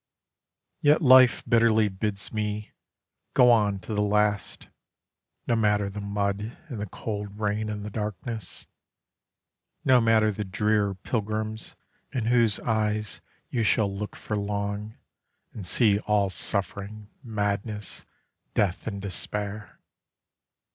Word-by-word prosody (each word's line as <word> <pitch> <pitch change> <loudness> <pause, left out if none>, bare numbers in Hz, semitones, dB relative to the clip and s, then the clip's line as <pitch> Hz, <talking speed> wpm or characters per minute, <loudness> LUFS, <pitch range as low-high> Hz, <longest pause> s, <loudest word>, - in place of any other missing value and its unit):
Yet 150 +2 +4
life 130 -2 +7
bitterly 115 -2 +4
bids 100 0 -4
me: 105 -1 -3 0.6
"Go 125 -1 +7
on 105 -4 +3
to 110 - -6
the 105 - +1
last, 105 -1 0 0.8
No 120 - +2
matter 105 -2 +2
the 105 +1 -6
mud 100 +2 -2
and 120 -6 -5
the 105 - -3
cold 105 +1 -5
rain 105 0 -1
and 105 -1 -4
the 105 - -6
darkness: 105 0 -5 1.2
No 130 -2 +6
matter 110 -1 +4
the 105 +1 -4
drear 105 +1 +1
pilgrims 110 +2 -3 0.4
in 125 -5 -2
whose 115 -3 +3
eyes 105 -3 -1 0.3
you 120 - 0
shall 105 -2 +2
look 105 +1 -5
for 105 - -4
long, 100 +1 -3 0.6
And 100 -5 -7
see 105 0 +3
all 105 -2 +1
suffering, 100 +2 -3
madness, 105 -3 -3 0.5
death 100 0 0
and 100 -2 -3
despair." 100 +1 -5
105 Hz, 120 wpm, -26 LUFS, 100-110 Hz, 1.2 s, life